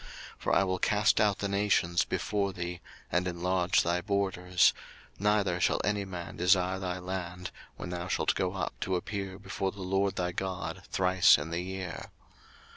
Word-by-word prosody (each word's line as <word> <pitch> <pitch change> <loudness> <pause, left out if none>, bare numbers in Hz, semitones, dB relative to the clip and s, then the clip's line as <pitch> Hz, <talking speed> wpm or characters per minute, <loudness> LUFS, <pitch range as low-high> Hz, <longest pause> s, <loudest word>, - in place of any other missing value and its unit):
02:034:024 - - -14 0.3
For - - 0
I - - +5
will 95 -1 -1
cast 105 +2 +3
out 105 -2 +3
the 100 - -2
nations 100 -4 +2
before 100 -2 -1
thee, 90 -1 -5 0.3
and 90 +1 +1
enlarge 90 0 +1
thy 85 +1 0
borders: 95 -2 +2 0.5
neither 100 -3 +2
shall - - +2
any 105 -1 0
man 90 -2 -7
desire 90 +1 +3
thy 90 -1 -3
land, 90 -1 -5 0.3
when 90 - -6
thou 90 0 -4
shalt - - +1
go - - -1
up - - -3
to 95 - -1
appear 95 0 -4
before 95 -1 -3
the 100 -1 -8
LORD 95 +1 0
thy 90 0 -1
God 95 +1 -4
thrice 90 -2 +5
in 75 +3 -5
the 85 +1 -1
year. 95 -1 -5
95 Hz, 175 wpm, -30 LUFS, 90-100 Hz, 0.5 s, I